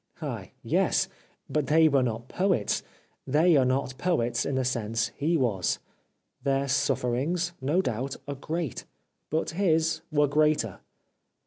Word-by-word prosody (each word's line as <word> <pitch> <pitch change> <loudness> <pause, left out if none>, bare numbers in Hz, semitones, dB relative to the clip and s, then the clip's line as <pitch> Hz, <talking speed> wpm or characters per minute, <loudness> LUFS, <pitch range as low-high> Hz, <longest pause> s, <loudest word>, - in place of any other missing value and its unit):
Ah, - - -5 0.2
yes! - - +2 0.4
but 150 -3 -1
they 160 +1 +5
were 140 -3 +3
not 120 -1 -2
poets, 190 +3 +1 0.5
they 160 +5 +4
are 135 -3 +5
not 130 0 0
poets, 120 -10 +1
in 140 - -1
the 130 -1 0
sense 115 -2 -1
he 160 +4 0
was. 105 - +1 0.6
Their 135 +1 +1
sufferings, 140 +6 0
no 155 +8 +2
doubt, 125 +2 -2
are 140 - -2
great, 155 +1 -4 0.4
but 160 +1 -1
his 160 -3 +1
were 145 -1 +3
greater. 150 -8 +1
140 Hz, 135 wpm, -27 LUFS, 125-160 Hz, 0.6 s, they